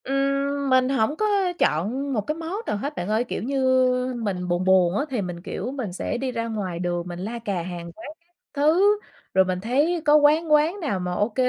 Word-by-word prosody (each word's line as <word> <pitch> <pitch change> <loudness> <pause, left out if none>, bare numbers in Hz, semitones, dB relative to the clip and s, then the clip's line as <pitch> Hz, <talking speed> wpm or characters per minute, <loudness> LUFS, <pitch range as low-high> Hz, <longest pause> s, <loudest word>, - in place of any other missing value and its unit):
Ừm, 275 +1 0
mình 260 0 +4
hổng 270 +1 +1
có 430 - 0 0.3
chọn 245 - 0
một 215 - +1
cái 305 +9 -3
món 330 +3 -5
nào - - -1
hết 285 +8 -4
bạn 175 - -4
ơi. 220 +2 +2
Kiểu 245 - -5
như 255 -1 +2
mình 180 -4 -2
buồn 175 +1 0
buồn 185 0 +4
á, 285 - 0
thì 250 -5 -1
mình, 175 -2 -5
kiểu, 210 +6 -5
mình 250 -10 -5
sẽ 190 - -3
đi 260 +1 -2
ra 230 -1 -3
ngoài 195 -6 -4
đường 175 0 -2
mình 175 0 -6
la 225 +6 -4
cà 200 -6 -2
hàng 170 -1 -7
quán - - -10
các 345 +1 -40 0.2
thứ. 355 +9 +3 0.3
Rồi 190 0 +5
mình 185 -1 -2
thấy 290 - +1
có 295 0 +6
quán 305 +2 +4
quán 310 +6 +3
nào 275 - -2
mà 180 0 -3
OK, 205 +4 -1
245 Hz, 225 wpm, -24 LUFS, 185-280 Hz, 0.3 s, có